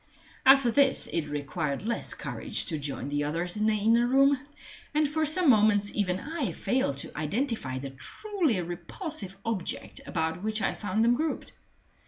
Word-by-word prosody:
After 270 -3 +7
this 275 +1 +4
it 165 -3 -2
required 145 +1 -3
less 235 +1 -2
courage - - -2
to 160 -5 -1
join 140 -1 -4
the 145 0 0
others 170 +4 -1
in 215 +1 +1
the 220 - +3
inner 230 +3 +3
room; 275 +2 +4 0.6
and 305 0 +3
for 310 +1 0
some 340 +3 +3
moments 210 -4 +4
even 185 -3 0
I 300 - -3
failed 250 - 0
to - - -13
identify 155 - -2
the 135 +1 -6
truly 320 - -1
repulsive 195 - -4
object 220 -6 -3
about 160 0 -2
which 215 +1 -1
I - - 0
found 210 +2 -1
them 235 +1 +5
grouped. 310 +5 -2
215 Hz, 165 wpm, -28 LUFS, 165-270 Hz, 0.6 s, After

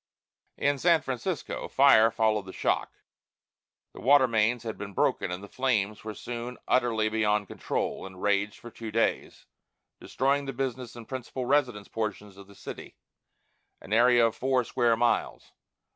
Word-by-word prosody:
In 140 -1 +1
San 170 -1 +3
Francisco, 150 +6 -4
fire 130 -5 +6
followed 110 -3 0
the - - -7
shock; - - 0 1.0
the - - -11
water 135 +1 +5
mains 115 +1 +1
had 110 -1 -4
been 100 -1 -8
broken, 100 - +1
and 90 +2 -5
the - - -8
flames 110 -5 -1
were 110 -1 -6
soon 120 +1 -6
utterly 115 -4 +2
beyond 105 -2 +1
control, - - -3
and 95 -1 -13
raged 100 +1 0
for 120 - -11
two 115 0 -7
days, 115 +2 -1 0.5
destroying 140 +2 0
the 135 - -3
business 125 -2 -4
and 115 -2 -10
principal 130 0 -5
residence 125 -7 +1
portions 105 -2 -4
of 100 0 -14
the 100 - -16
city - - -9 0.8
an 105 - -7
area 120 +1 +5
of 115 - 0
four 130 -1 +1
square 120 -1 +1
miles. 120 0 0
115 Hz, 160 wpm, -28 LUFS, 105-130 Hz, 1.0 s, fire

